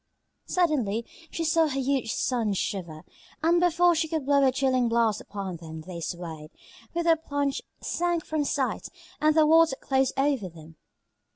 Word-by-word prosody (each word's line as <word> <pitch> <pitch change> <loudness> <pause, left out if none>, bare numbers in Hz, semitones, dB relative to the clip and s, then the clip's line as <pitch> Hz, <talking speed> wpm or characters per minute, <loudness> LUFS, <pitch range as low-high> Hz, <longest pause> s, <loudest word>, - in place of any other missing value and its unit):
Suddenly 255 - 0 0.2
she 335 - -3
saw 325 0 +3
her 275 -2 -2
huge 265 -4 0
sons 225 -6 0
shiver, 170 -7 -4 0.4
and 340 +2 +4
before 350 0 +4
she 320 0 0
could 315 -3 -3
blow 280 0 +4
a 265 - +5
chilling 255 -2 +1
blast 230 -2 +1
upon 195 -4 -6
them 160 -1 -9
they 175 +1 -8
swayed, 160 -2 -6
and - - -23
with 340 0 0
a 330 -1 +5
plunge 285 -3 -2 0.2
sank 345 -1 -1
from 310 -1 -1
sight, 270 -5 -2 0.3
and 305 0 +4
the 310 - +6
water 320 -2 +5
closed 265 -1 0
over 270 -8 +1
them. 160 -1 -14
270 Hz, 170 wpm, -27 LUFS, 200-315 Hz, 0.4 s, the